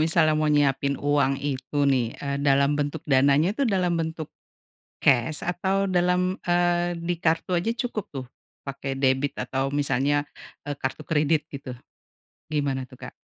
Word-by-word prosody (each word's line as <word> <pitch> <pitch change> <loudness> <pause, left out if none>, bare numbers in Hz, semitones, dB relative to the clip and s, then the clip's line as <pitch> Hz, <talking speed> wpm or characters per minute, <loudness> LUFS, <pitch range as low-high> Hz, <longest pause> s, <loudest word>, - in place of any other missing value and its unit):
misalnya 155 -1 +3
mau 155 0 +1
nyiapin 140 -2 +2
uang 145 -2 +1
itu 130 +1 -4
nih, 125 -3 +2 0.2
eee, 140 0 -2
dalam 140 +1 +4
bentuk 145 +1 -2
dananya 140 +5 +4
tuh, 275 - +1
dalam 180 -3 +1
bentuk 160 -1 -4 0.7
kes 140 +4 +2
atau 190 +3 0
dalam, 180 0 +1
eee, 175 0 +1
di 170 +1 -2
kartu 165 +3 +1
aja 180 +6 +1
cukup, 225 -3 -3
tuh? 130 -1 -5 0.4
Pakai 135 0 -4
debit 135 +1 +1
atau 135 +1 -2
misalnya, 145 0 +1 0.4
eee 145 - -3
kartu 130 +3 -4
kredit 155 -1 +1
gitu, 140 -2 -6 0.8
gimana 140 -3 -1
tuh, 130 - -14
Kak? - - -30
145 Hz, 150 wpm, -25 LUFS, 140-175 Hz, 0.8 s, dalam